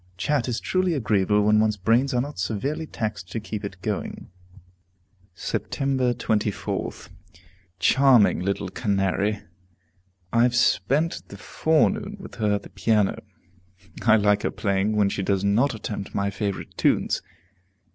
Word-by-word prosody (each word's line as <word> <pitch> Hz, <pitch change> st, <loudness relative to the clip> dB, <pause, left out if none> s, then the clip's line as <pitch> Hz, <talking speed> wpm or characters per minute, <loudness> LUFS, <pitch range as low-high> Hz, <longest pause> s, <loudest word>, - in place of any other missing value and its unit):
Chat 135 Hz, +6 st, 0 dB
is 125 Hz, -1 st, -1 dB
truly 185 Hz, -2 st, 0 dB
agreeable 105 Hz, -4 st, +2 dB
when 105 Hz, +1 st, +4 dB
one's 110 Hz, -1 st, +2 dB
brains 115 Hz, +8 st, +2 dB
are 125 Hz, -, +1 dB
not 145 Hz, -2 st, -6 dB
severely 130 Hz, -, -2 dB
taxed 100 Hz, -9 st, -5 dB
to 115 Hz, -, -2 dB
keep 110 Hz, -1 st, -6 dB
it 100 Hz, -2 st, -6 dB
going." 105 Hz, -3 st, -4 dB, 1.1 s
Sept. -, -, -3 dB, 0.5 s
24th. 105 Hz, -1 st, -2 dB, 0.7 s
Charming 125 Hz, +3 st, +4 dB
little 100 Hz, +1 st, -2 dB
Canary! 100 Hz, 0 st, 0 dB, 0.9 s
I 115 Hz, -, +4 dB
have 120 Hz, 0 st, +3 dB
spent 140 Hz, +6 st, +2 dB
the 100 Hz, -, -10 dB
forenoon 160 Hz, -, 0 dB
with -, -, -10 dB
her 105 Hz, -3 st, +1 dB
at 100 Hz, -, -4 dB
the -, -, -13 dB
piano. 105 Hz, -3 st, +1 dB, 0.8 s
I 110 Hz, -1 st, +5 dB
like 105 Hz, -1 st, +3 dB
her -, -, 0 dB
playing 100 Hz, +1 st, 0 dB
when 105 Hz, -2 st, +3 dB
she 100 Hz, -, -3 dB
does 95 Hz, 0 st, 0 dB
not 115 Hz, +6 st, +2 dB
attempt 105 Hz, -2 st, -6 dB
my 100 Hz, 0 st, 0 dB
favorite 100 Hz, -1 st, -4 dB
tunes. -, -, +1 dB
105 Hz, 140 wpm, -24 LUFS, 100-125 Hz, 1.1 s, I